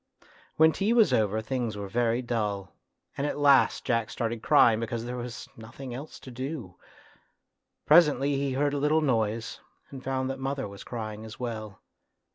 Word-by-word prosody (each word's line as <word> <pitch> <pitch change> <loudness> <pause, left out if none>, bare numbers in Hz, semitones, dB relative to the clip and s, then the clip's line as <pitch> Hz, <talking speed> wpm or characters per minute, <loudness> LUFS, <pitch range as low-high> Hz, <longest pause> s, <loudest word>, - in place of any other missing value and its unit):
When 160 0 +6
tea 200 +7 0
was 230 -3 +4
over 110 0 +1
things 115 -2 -2
were 100 -1 -5
very 120 +3 0
dull, 105 -5 -2 0.4
and 140 - -1
at - - -3
last 140 -2 +4
Jack 115 -2 0
started 115 -1 -3
crying 110 -1 +5
because 115 0 -3
there 125 +1 -4
was 120 -1 -6
nothing 120 +3 -9
else 140 +5 -8
to 130 - -10
do. 130 - -6 1.1
Presently 150 -3 +5
he 135 -1 -1
heard 145 +2 +1
a 145 - -1
little 150 +2 +2
noise 115 -5 -1 0.3
and 130 -2 -9
found 130 0 -1
that 135 - -6
mother 135 -1 -3
was 100 -1 -10
crying 110 -2 -6
as 110 0 -10
well. 110 -5 -6
120 Hz, 170 wpm, -27 LUFS, 110-140 Hz, 1.1 s, When